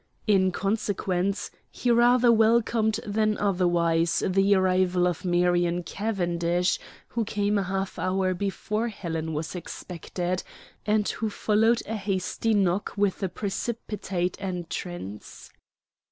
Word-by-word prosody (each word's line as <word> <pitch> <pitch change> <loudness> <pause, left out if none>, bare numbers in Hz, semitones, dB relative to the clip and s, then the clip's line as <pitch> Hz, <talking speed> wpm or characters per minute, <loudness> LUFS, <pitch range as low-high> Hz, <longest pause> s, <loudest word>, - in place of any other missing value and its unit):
In 190 -3 +3
consequence, 195 -1 -1 0.2
he 245 - -1
rather 240 +1 +5
welcomed 225 0 +3
than 215 0 +1
otherwise 175 -4 +2
the 195 +2 +3
arrival 185 -1 +2
of 180 0 -1
Marion 175 -1 +2
Cavendish, 175 -4 0 0.3
who 230 - -1
came 205 0 0
a - - +1
half 195 0 -3
hour 185 0 +1
before 205 +4 -2
Helen 165 -7 -4
was 155 +2 -3
expected, 180 0 -4 0.5
and 210 0 +2
who 220 - -2
followed 220 +3 +2
a 220 +1 -3
hasty 195 +2 -1
knock 195 0 +1
with 200 -2 +1
a 190 - 0
precipitate 200 -3 -3
entrance. 175 - -6
190 Hz, 115 wpm, -26 LUFS, 175-215 Hz, 0.5 s, rather